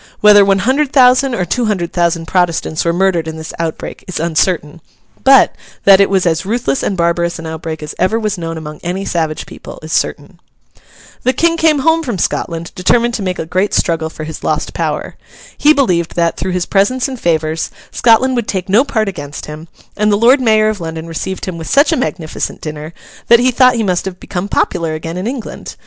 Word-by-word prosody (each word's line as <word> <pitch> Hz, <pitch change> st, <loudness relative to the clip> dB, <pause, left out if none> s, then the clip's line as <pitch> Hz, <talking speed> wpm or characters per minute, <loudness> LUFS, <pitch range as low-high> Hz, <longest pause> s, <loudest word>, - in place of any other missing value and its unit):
Whether 210 Hz, -1 st, +7 dB
one 195 Hz, 0 st, +3 dB
hundred 265 Hz, +7 st, +1 dB
thousand 255 Hz, -1 st, +4 dB
or 180 Hz, -, -1 dB
two 240 Hz, +8 st, -1 dB
hundred 185 Hz, -6 st, -2 dB
thousand 170 Hz, -1 st, 0 dB
Protestants 170 Hz, -2 st, 0 dB
were 170 Hz, -, +1 dB
murdered 175 Hz, -2 st, +1 dB
in 160 Hz, 0 st, -5 dB
this 160 Hz, 0 st, -7 dB
outbreak, 165 Hz, -1 st, -4 dB
is 185 Hz, -, -4 dB
uncertain; 165 Hz, -1 st, -1 dB, 0.4 s
but, 270 Hz, -1 st, +6 dB, 0.3 s
that 195 Hz, 0 st, +7 dB
it 200 Hz, -, +3 dB
was 190 Hz, -2 st, +1 dB
as 160 Hz, -1 st, +1 dB
ruthless 195 Hz, -, -1 dB
and 195 Hz, -, -2 dB
barbarous 170 Hz, 0 st, 0 dB
an 165 Hz, -, -8 dB
outbreak 160 Hz, -1 st, -6 dB
as 150 Hz, -, -6 dB
ever 200 Hz, +5 st, +1 dB
was 215 Hz, -2 st, -1 dB
known 165 Hz, -2 st, -5 dB
among 150 Hz, -1 st, -8 dB
any 185 Hz, +3 st, -3 dB
savage 160 Hz, -4 st, -2 dB
people, -, -, -11 dB
is 155 Hz, -, -6 dB
certain. 160 Hz, +5 st, -2 dB, 0.8 s
The 255 Hz, -, +1 dB
King 330 Hz, +6 st, +2 dB
came 320 Hz, -2 st, +3 dB
home 325 Hz, 0 st, +4 dB
from 245 Hz, -10 st, -3 dB
Scotland, 165 Hz, -1 st, -2 dB
determined 235 Hz, +6 st, +1 dB
to 225 Hz, -, -3 dB
make 185 Hz, -2 st, -2 dB
a -, -, -4 dB
great 185 Hz, +5 st, 0 dB
struggle 160 Hz, -2 st, 0 dB
for 155 Hz, -, -8 dB
his 155 Hz, 0 st, -7 dB
lost -, -, -1 dB
power. -, -, -3 dB, 0.4 s
He 295 Hz, -, +4 dB
believed 180 Hz, -, +1 dB
that, 170 Hz, -1 st, +1 dB
through 185 Hz, -1 st, -3 dB
his 180 Hz, -1 st, -1 dB
presents 225 Hz, +7 st, +1 dB
and 260 Hz, -2 st, -7 dB
favours, 160 Hz, -2 st, 0 dB, 0.2 s
Scotland 245 Hz, +3 st, +3 dB
would 235 Hz, -3 st, -2 dB
take 190 Hz, -1 st, -3 dB
no 215 Hz, +7 st, +5 dB
part 220 Hz, -7 st, -1 dB
against 145 Hz, -7 st, -6 dB
him; 155 Hz, +2 st, -9 dB, 0.3 s
and 210 Hz, 0 st, +1 dB
the 205 Hz, -, +3 dB
Lord 250 Hz, +5 st, +4 dB
Mayor 215 Hz, -2 st, +3 dB
of 210 Hz, -4 st, -4 dB
London 160 Hz, 0 st, -5 dB
received 175 Hz, +3 st, -5 dB
him 180 Hz, -3 st, -5 dB
with 160 Hz, -, -7 dB
such 285 Hz, +4 st, +4 dB
a -, -, +2 dB
magnificent 160 Hz, -, -3 dB
dinner 155 Hz, 0 st, -7 dB, 0.4 s
that 235 Hz, -, +7 dB
he 255 Hz, +1 st, +3 dB
thought 255 Hz, 0 st, +4 dB
he 230 Hz, -, 0 dB
must 180 Hz, -3 st, 0 dB
have 185 Hz, -1 st, -6 dB
become 180 Hz, +2 st, -4 dB
popular 165 Hz, -6 st, 0 dB
again 165 Hz, +1 st, -6 dB
in 185 Hz, +4 st, -3 dB
England. 250 Hz, -2 st, -6 dB
185 Hz, 210 wpm, -15 LUFS, 165-230 Hz, 0.8 s, Whether